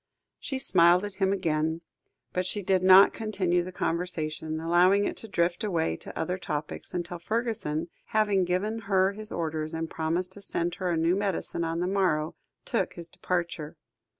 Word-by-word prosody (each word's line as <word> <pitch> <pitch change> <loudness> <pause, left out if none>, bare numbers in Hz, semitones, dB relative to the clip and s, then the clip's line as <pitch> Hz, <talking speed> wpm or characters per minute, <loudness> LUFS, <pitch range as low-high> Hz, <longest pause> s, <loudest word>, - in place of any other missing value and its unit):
She 270 - -3
smiled 180 -7 +4
at 200 -2 -8
him 190 -1 +2
again, 160 -3 0 0.5
but 180 - 0
she 200 +2 -3
did 185 0 +2
not 190 +1 +8
continue 190 -5 0
the 180 +1 -6
conversation, 160 -3 -2
allowing 180 +5 +4
it - - -2
to 225 - -7
drift 175 0 0
away 170 -6 0
to - - -7
other 180 +3 -2
topics, 150 -3 -5
until 175 -1 -4
Fergusson, 215 -6 -2 0.2
having 210 -3 +2
given 190 +5 -1
her 190 -1 +4
his 215 +2 -5
orders, 160 -1 -3
and 165 0 -2
promised 170 +3 -1
to 205 - -12
send 175 -3 -2
her 185 - 0
a 170 - +1
new 165 +3 +2
medicine 195 -3 -2
on 165 +1 -1
the 180 - 0
morrow, 180 -5 +1 0.3
took - - -1
his 170 -1 -9
departure. 170 -4 -3
180 Hz, 175 wpm, -28 LUFS, 165-195 Hz, 0.5 s, not